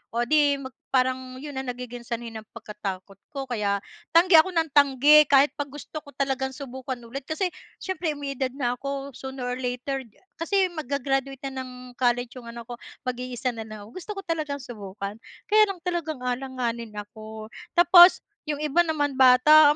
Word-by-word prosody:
O 240 - +2
di 290 +2 +4
mag 270 -1 -7 0.2
parang 255 0 +1
'yon 290 -3 -5
ang 265 - -5
nagiging 245 -1 -6
sanhi 235 -1 -4
ng 220 -1 -8
pagkatakot 200 -3 -7 0.2
ko, 275 - -2
kaya 210 -6 -1 0.3
tanggi 340 0 +8
ako 315 - +5
ng 325 -1 +2
tanggi 285 +1 +6
kahit 280 0 +5
'pag 290 - -1
gusto 295 +2 -8
ko 300 - -25
talagang 265 -1 -1
subukan 260 -1 -6
ulit. 260 +4 -8
Kasi 360 +3 -1 0.3
siyempre 350 -5 -2
may 285 -1 -4
edad 265 -1 -1
na 250 -3 -1
ako, 275 0 -4
sooner 265 0 -7
or 250 +1 -3
later, 250 +2 -2 0.4
kasi 375 +2 +1
mag-ga-graduate 275 -3 -2
na 265 - -5
ng 255 - -10 0.3
college 245 -1 +1
yung 235 - -12
anak 235 0 -8
ko, 240 -1 -8 0.3
mag-iisa 250 0 -2
na 225 -2 -7
lang 215 -1 -9
ako, 205 - -13
gusto 370 - -7
ko - - -5
talagang 310 -5 -2
subukan 205 -5 -7 0.4
kaya 430 0 +7
lang 390 -2 -5
talagang 335 -5 -2
alanganin 245 -3 -3
ako. 215 +1 -9 0.2
Tapos 350 +1 +8 0.2
yung 295 -1 -2
iba 300 +2 +1
naman 290 -4 -1
bata. 290 +4 +7
265 Hz, 175 wpm, -25 LUFS, 240-295 Hz, 0.4 s, tanggi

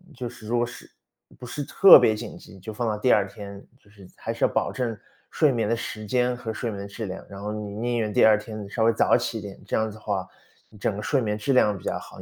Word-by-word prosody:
就 125 -2 -5
是 110 - -12
如 120 - 0
果 120 - +2
是 120 - -11 0.5
不 125 - -10
是 145 +4 -5
特 180 +4 +8
别 110 -3 +3
紧 - - -7
急， 95 - -14
就 105 +4 -8
放 115 +2 -3
到 105 -1 -1
第 125 +4 +2
2 100 -2 +4
天。 100 0 -10 0.2
就 100 - -26
是 100 -3 -15
还 - - -4
是 - - +1
要 - - +2
保 - - 0
证 115 -4 -3 0.3
睡 150 -3 +3
眠 115 -4 0
的 115 - +1
时 110 -2 -6
间 125 +2 +1
和 115 -2 -5
睡 115 +1 -3
眠 100 -1 -6
的 - - -7
质 105 +2 -6
量， 95 +1 -6
然 100 -1 -9
后 105 +1 -4
你 105 -1 -5
宁 120 +2 -1
愿 110 -2 -1
第 - - +4
2 110 -1 +7
天 110 -1 -7
你 100 - -10
稍 110 +1 0
微 115 - +4
早 110 - +4
起 120 -2 -3
一 - - -8
点， 100 -1 -9
这 - - -1
样 110 0 0
子 110 - -12
的 - - -15
话， 100 -3 -2 0.5
整 105 0 -1
个 105 - -5
睡 140 +3 +1
眠 105 -3 -1
质 110 +6 -1
量 105 -6 +3
比 - - -14
较 - - -2
好， - - -12
110 Hz, 305 characters per minute, -25 LUFS, 105-120 Hz, 0.5 s, 特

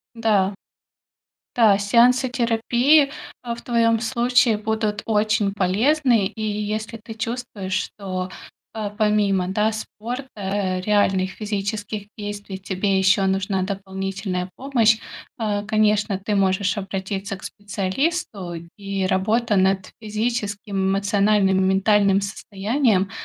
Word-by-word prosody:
Да. 205 -4 +2 1.0
Да, 220 -4 +6
сеансы 240 +5 +4
терапии, 245 +4 +3 0.3
а, 235 -2 -3
в 235 - -10
твоём 230 -2 +2
случае 240 -1 +2
будут 215 -1 -2
очень 215 -1 +1
полезны. 225 +4 +2
И 220 - -11
если 215 +1 -3
ты 225 0 -10
чувствуешь, 220 -4 -4 0.2
что, 185 -2 -5 0.4
а, 215 -2 -3
помимо, 205 -3 +1
да, 210 +3 +1
спорта, 235 +4 -6
э, 195 -2 -2
реальных 195 -2 +2
физических 205 0 -4
действий 205 -2 -6
тебе 190 +1 -1
ещё 190 +1 +3
нужна 190 0 0
дополнительная 190 -1 -4
помощь, 240 -5 +3 0.4
а, 210 -3 -1
конечно, 210 -1 +2
ты 205 +2 -2
можешь 190 0 +1
обратиться 195 +1 -4
к 190 - -17
специалисту, 205 - -3 0.2
и 195 -1 -3
работа 210 +4 +1
над 190 0 +2
физическим, 210 -2 -3 0.2
эмоциональным 200 -1 +2
и - - +2
ментальным 200 0 +3
состоянием 200 +1 0
205 Hz, 115 wpm, -22 LUFS, 195-225 Hz, 1.0 s, Да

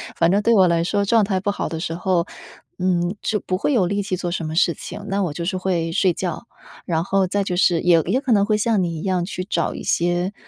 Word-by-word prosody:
反 165 - +3
正 200 +2 +3
对 230 +2 +3
我 190 -2 +6
来 170 -1 +2
说 200 +3 0
状 225 +1 +3
态 195 -2 0
不 200 +2 -2
好 - - -3
的 160 - -4
时 165 -1 -3
候， 180 -1 0 0.5
嗯， 180 0 0
就 215 - -1
不 185 -1 -2
会 290 - 0
有 190 -7 +3
力 200 +1 -1
气 185 -2 -2
做 175 -1 -3
什 170 -2 -3
么 155 +1 -4
事 170 -1 +3
情， 205 - -8
那 200 0 0
我 160 -5 -2
就 170 +2 -4
是 185 +1 -1
会 175 -3 -1
睡 185 0 +2
觉。 180 +5 -4 0.4
然 165 -1 0
后 195 -1 +2
再 200 +2 0
就 180 -2 -2
是， 175 -2 +3
也 175 -2 +4
也 260 - 0
可 265 -4 -2
能 200 -1 +3
会 215 -1 +1
像 215 -3 +1
你 165 -2 -3
一 - - -7
样 185 -2 0
去 185 -1 -5
找 170 -5 -1
一 - - -7
些 175 +3 0
185 Hz, 285 characters per minute, -21 LUFS, 170-200 Hz, 0.5 s, 我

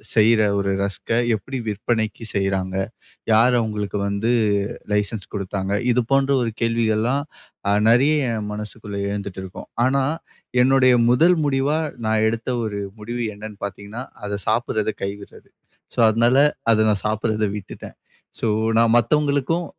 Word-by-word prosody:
செய்ற 110 0 +5 0.2
ஒரு 100 0 0
ரஸ்க்க 100 +3 -2 0.2
எப்படி 130 +6 -6
விற்பனைக்கு 110 +2 -2
செய்றாங்க? 95 -1 -1 0.6
யார் 120 +3 +5
அவங்களுக்கு 105 -2 -2
வந்து 100 +4 0 0.6
லைசென்ஸ் 105 0 -1
குடுத்தாங்க? 100 0 -3 0.2
இது 125 +1 +2
போன்ற 135 0 +3
ஒரு 115 - -2
கேள்விகள்ல்லாம் 115 +3 +1 0.5
அ - - +4 0.2
நெறைய 140 +4 +4
என் 105 -1 -4
மனசுக்குள்ள 105 -1 -6
எழுந்துட்டு 100 -2 -5
இருக்கும். 95 -1 -9 0.2
ஆனா 135 +1 +2 0.6
என்னுடைய 130 -1 +5 0.2
முதல் 165 +8 +5
முடிவா, 140 +2 +1 0.3
நான 110 0 +2
எடுத்த 115 +2 -4 0.2
ஒரு 105 -2 -3 0.2
முடிவு 120 +3 -4
என்னன்னு 105 -1 -9
பார்த்தீங்கன்னா, 100 +4 -7 0.2
அத 105 - -4 0.2
சாப்பிடுறத 110 -2 0
கைவிடுறது. 100 +1 -7 0.5
சோ - - -4
அதனால 120 +4 +3 0.3
அத 110 0 +4
நான் 100 -2 -2
சாப்டுறத 110 0 0
விட்டுட்டேன். 100 - -10 0.4
சோ 115 - +1 0.3
நான் 115 0 +4
மத்தவங்களுக்கும் 150 +5 +1
110 Hz, 130 wpm, -22 LUFS, 105-125 Hz, 0.6 s, செய்ற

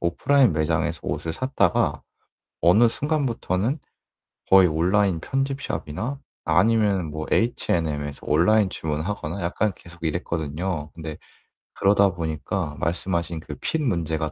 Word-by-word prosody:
오프라인 120 - +3
매장에서 80 +1 0
옷을 80 - -3
샀다가 130 +8 +1 0.6
어느 105 +8 +6
순간부터는 130 - -1 0.7
거의 95 -1 +8
온라인 90 +3 +2
편집샵이나 135 - -3 0.3
아니면은 100 -3 +3
뭐 80 +1 -5
H&M에서 75 - 0
온라인 95 +7 +4
주문하거나 80 +3 -3
약간 95 +5 0
계속 85 -1 -16
이랬거든요. 80 0 -2
근데 80 -2 -6 0.6
그러다 100 0 +4
보니까 80 0 -3
말씀하신 85 0 -1
그 75 -2 -8
핏 160 - -1
문제가 80 - -1
85 Hz, 305 characters per minute, -24 LUFS, 80-110 Hz, 0.7 s, 거의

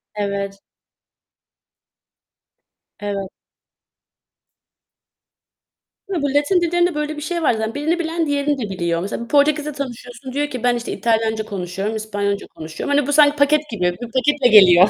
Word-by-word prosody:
Evet. 200 -1 -3 2.4
Evet. 200 -2 -3 2.8
Bu 285 -7 -1
Latin 295 +6 +3
dillerinde 345 0 +1
böyle 300 0 -2
bir - - -6
şey 340 +2 -2
var 245 - +4
zaten 220 +2 -3
birini 320 +4 0
bilen 330 -1 -1
diğerini 285 0 0
de 215 -5 -4
biliyor. 170 -2 -1
Mesela 205 +4 -4
bir - - -10
Portekiz'le 300 0 +2
tanışıyorsun 260 -1 -7
diyor 290 +1 0
ki 250 -4 -6
ben, 245 -1 +3
işte, 240 - -4
İtalyanca 220 -1 0
konuşuyorum, 195 +2 -4
İspanyolca 205 -2 -2
konuşuyorum. 160 - -4
Hani, 290 -1 +1
bu 290 - 0
sanki 295 0 +6
paket 300 +1 +2
gibi. 215 -6 -4 0.2
Bir 235 - -6
paketle 265 +1 +2
geliyor. 190 -3 +8
250 Hz, 140 wpm, -20 LUFS, 205-295 Hz, 2.8 s, geliyor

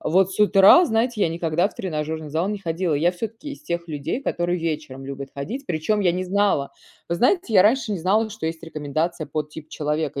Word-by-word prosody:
вот 190 +3 +2
с - - -4
утра, 205 - +7
знаете, 225 -2 0
я 170 - +3
никогда 165 +3 0
в - - -18
тренажерный 155 -3 -4
зал 165 +5 0
не 210 0 -2
ходила. 170 -2 -1
Я 170 +5 +2
всё-таки 225 +9 -6
из 285 - -11
тех 170 -10 -3
людей, 155 - -3
которые 175 -6 -1
вечером 150 -5 -4
любят 140 0 -6
ходить. 235 - -5
Причем 175 +6 0
я 180 -4 +3
не 185 +1 -2
знала 195 -7 +1 0.4
вы 170 - -1
знаете, 255 - +2
я 185 - +8
раньше 225 +1 +2
не 195 - -2
знала, 210 +6 +1
что 215 -6 -5
есть 165 0 -4
рекомендация 155 +1 -3
под 150 +1 -4
тип 155 0 -10
человека. 150 -2 -2
170 Hz, 210 wpm, -23 LUFS, 155-205 Hz, 0.4 s, я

